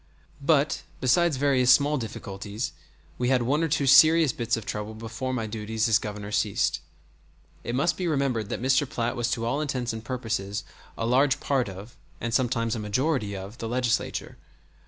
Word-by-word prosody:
But, 145 0 +2 0.2
besides 160 +3 +3
various 130 -2 +2
small 145 +3 +5
difficulties, 105 -1 -5 0.5
we 125 0 +1
had 130 -2 +3
one 140 +6 +1
or 165 - +2
two 145 -2 0
serious 155 +2 +6
bits 115 -1 -1
of 110 - -7
trouble 105 +1 -4
before 115 +4 -5
my 120 -3 -2
duties 110 +1 -2
as 110 - +4
Governor 105 -1 -6
ceased. 105 -1 +1 0.8
It 120 - -3
must 140 +6 +1
be 180 - -2
remembered 135 -9 0
that - - -4
Mr. 130 +1 +2
Platt 120 0 -2
was 120 0 -1
to 115 -1 -1
all 140 +6 0
intents 130 -5 -2
and 110 0 -6
purposes 110 -4 -3 0.3
a 115 - -2
large 135 +3 +3
part 130 -6 0
of, 100 +6 -10 0.2
and 120 -1 -3
sometimes 115 -3 +1
a 115 - -3
majority 105 0 -1
of, 100 +5 -9
the 115 - -4
Legislature. 125 -1 -1
120 Hz, 180 wpm, -26 LUFS, 110-135 Hz, 0.8 s, serious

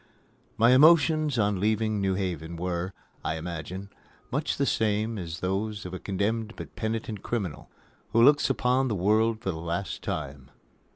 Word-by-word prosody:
My 115 +2 +5
emotions 155 0 +5
on 105 -3 +1
leaving 110 0 +1
New 95 -1 +1
Haven 85 -4 -3
were, 90 +1 -2 0.3
I 80 - -1
imagine, 90 +4 -6 0.4
much - - -1
the - - +2
same 110 0 0
as 85 -1 -6
those 100 +2 -2
of 90 - -6
a 95 - -4
condemned 105 +3 -2
but - - -9
penitent 110 -2 -3
criminal 100 -11 -4 0.4
who 115 - +5
looks 145 +2 +5
upon 130 +1 +2
the 110 - -1
world 110 +4 +2
for 95 - -1
the 80 - -6
last 85 +4 -3
time. 70 -3 -5
100 Hz, 160 wpm, -27 LUFS, 90-115 Hz, 0.4 s, My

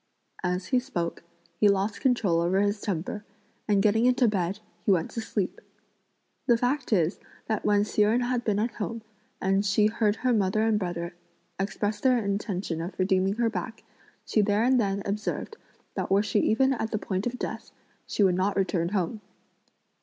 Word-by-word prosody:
As 180 +1 -1
he 255 - +6
spoke, 175 -10 -3 0.4
he 210 - +6
lost 200 +1 0
control 215 -10 +2
over 180 +3 +2
his 205 +1 +1
temper, 200 +2 -3 0.4
and, 200 -2 +3
getting 225 +3 +4
into 250 -1 +4
bed, 190 -2 0 0.3
he - - -1
went 180 -4 +2
to 230 - -4
sleep. 205 -4 -3 0.9
The 235 - +5
fact 250 +3 -1
is 175 -3 +2 0.3
that 220 -2 -2
when 205 0 +4
Hsi 210 - 0
Jen 220 +4 +4
had 245 0 0
been 210 -3 +1
at 225 +3 0
home, 225 +1 -5 0.4
and 195 +1 +2
she 205 +1 +3
heard 215 -1 +2
her 255 +1 +1
mother 210 0 +2
and 220 -2 +2
brother 175 -2 -3 0.5
express 205 +2 -1
their 255 0 +3
intention 200 -5 -2
of 175 +4 -6
redeeming 190 +1 +2
her 235 0 +1
back, 220 +3 -5 0.4
she 215 - +2
there 205 +2 +2
and 255 +1 +4
then 200 -1 -1
observed 210 - -3 0.4
that - - -3
were 195 +2 +4
she 205 0 +1
even 265 +6 +3
at 225 -3 -2
the 215 - -1
point 195 +1 -2
of 245 +1 -4
death, - - -5 0.4
she 205 - +1
would 190 -2 +4
not 190 +3 +1
return 180 -3 +1
home. 200 +2 -2
205 Hz, 185 wpm, -27 LUFS, 190-225 Hz, 0.9 s, he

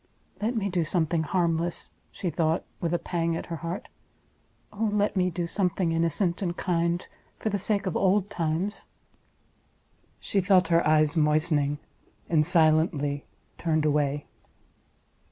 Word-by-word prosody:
"Let 230 +4 0
me 205 -3 0
do 180 -3 0
something 165 0 +1
harmless!" 170 0 -1 0.2
she 180 - -3
thought, 160 0 0
with 170 - -1
a 175 - +2
pang 170 -1 -1
at - - -4
her - - -3
heart—"oh 200 +4 -7
let 205 0 +1
me 180 -1 +2
do 175 0 -3
something 180 -1 0
innocent 170 +3 0
and 175 -2 -2
kind 170 -1 0 0.3
for 220 - -2
the 200 -1 -1
sake 200 +1 0
of 185 - -2
old 195 +1 +2
times!" 175 +1 -2 1.3
She 200 - 0
felt 185 0 +4
her 170 0 +4
eyes 155 0 +3
moistening, 150 -2 +2 0.5
and 155 -3 +3
silently 155 -3 +2 0.3
turned 155 -2 +1
away. 145 -1 +1
170 Hz, 135 wpm, -27 LUFS, 155-185 Hz, 1.3 s, felt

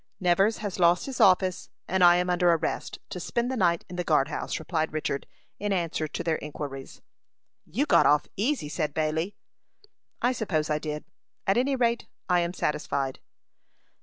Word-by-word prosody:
"Nevers 195 +4 +3
has 205 -3 -5
lost 175 0 +4
his 270 -2 -3
office, 185 -1 +3 0.2
and 190 0 +2
I 175 0 +8
am 180 0 +1
under 180 -1 +3
arrest, 165 -1 -1
to 195 -3 -5
spend 235 +8 -1
the - - -1
night 175 -6 +2
in 180 - -8
the 180 - -1
guard 150 -4 +2
house," - - -3
replied 160 0 -2
Richard, 145 -3 -2 0.3
in 205 0 -2
answer 165 -4 -1
to - - -5
their 165 -2 +1
inquiries. 140 -2 -7 0.6
"You 255 - 0
got - - +5
off 150 0 +4
easy," 235 - 0
said 150 -1 -2
Bailey. 160 +5 -1 0.8
"I 245 - +2
suppose 165 -11 -1
I 150 - +1
did; 150 -1 -5 0.4
at 195 - +3
any 270 +3 +2
rate, 235 -2 0 0.2
I 180 -1 +3
am 170 0 0
satisfied." 140 -4 -1
175 Hz, 175 wpm, -27 LUFS, 155-195 Hz, 0.8 s, I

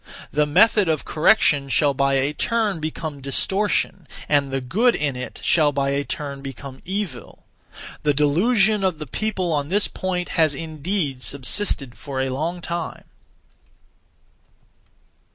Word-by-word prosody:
The 150 0 +2
(method 205 +4 +4
of) 155 -2 0
correction 150 -4 +3
shall 145 +1 +3
by 140 0 +1
a 135 +2 +1
turn 215 0 0
become 155 -2 -5
distortion, 190 +4 0 0.2
and 140 -2 +2
the 135 0 -1
good 220 - +2
in 145 -3 -1
it 125 0 -7
shall 155 -3 +4
by 140 -1 0
a 140 +1 0
turn 140 -4 -5
become 135 0 -9
evil. 190 -9 -5 0.6
The 150 - +2
delusion 195 - +3
of 185 -4 +1
the 150 - -6
people 185 - -2
(on 145 -1 0
this 205 +3 +3
point) 180 -1 -3
has 155 -4 +2
indeed 155 -2 -3
subsisted 140 0 -1
for 140 -2 -6
a 130 0 0
long 165 +6 -3
time. 170 -1 -4
150 Hz, 140 wpm, -22 LUFS, 140-185 Hz, 0.6 s, method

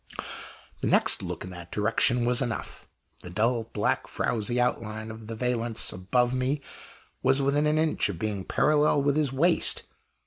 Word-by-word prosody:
The - - -2
next - - +4
look - - -5
in 95 - -8
that 90 -1 -10
direction 115 +3 +2
was 120 +1 +3
enough. 120 -3 -5 0.3
The 90 - -9
dull, 115 +5 0
black, 110 -2 -1
frowzy 120 +2 -1
outline 110 -3 -2
of 110 -1 -10
the 115 - -5
valance 120 -1 -1
above 120 +7 +1
me 130 +3 0 0.6
was 135 +1 +3
within 140 +2 +2
an 150 +1 +2
inch 155 -8 +1
of 95 - -4
being 100 0 -3
parallel 150 +4 +2
with 145 0 +2
his 150 -4 +1
waist. 165 +6 +2
120 Hz, 165 wpm, -27 LUFS, 110-135 Hz, 0.6 s, next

